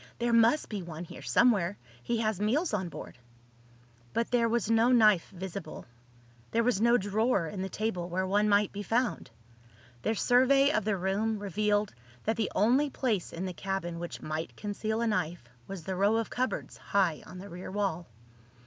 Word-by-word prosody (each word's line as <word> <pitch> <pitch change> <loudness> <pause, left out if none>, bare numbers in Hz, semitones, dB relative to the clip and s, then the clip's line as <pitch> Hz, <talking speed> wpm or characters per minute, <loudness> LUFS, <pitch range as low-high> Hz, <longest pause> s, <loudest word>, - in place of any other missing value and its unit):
"There 240 0 0
must 230 +6 +4
be 210 -3 -4
one 170 -1 -7
here 165 - -10
somewhere. 190 - +3 0.2
He 235 - -1
has 215 -3 -1
meals 280 +10 +1
on 190 -4 -1
board." 135 - -9 0.9
But 230 - -1
there 235 -2 +3
was 235 -2 0
no 230 +2 +4
knife 215 -7 +5
visible. 190 -2 -7 0.6
There 230 - +1
was 230 -4 +1
no 235 +1 +5
drawer 205 -1 +1
in 185 +4 -5
the 190 - -3
table 185 -4 -2
where 185 +2 -1
one 205 +2 +2
might 205 0 +3
be 205 - -5
found. 235 +4 -1 0.7
Their 220 - 0
survey 270 +5 +4
of 215 -7 0
the 215 -2 +1
room 200 +4 0
revealed 205 +1 0 0.3
that 220 - 0
the 215 -3 -1
only 255 +8 +3
place 230 -9 -1
in 180 +3 -4
the 185 - -4
cabin 175 -2 -3
which 175 0 -6
might 155 +1 -4
conceal 215 +2 -2
a 235 - +1
knife 175 - -1 0.2
was 195 -4 -7
the 190 +3 -3
row 200 +4 +3
of 225 -1 -1
cupboards 255 +1 -2
high 185 -6 0
on - - -10
the 190 +2 -8
rear 180 -1 -8
wall. 190 -4 -2
205 Hz, 185 wpm, -30 LUFS, 185-230 Hz, 0.9 s, knife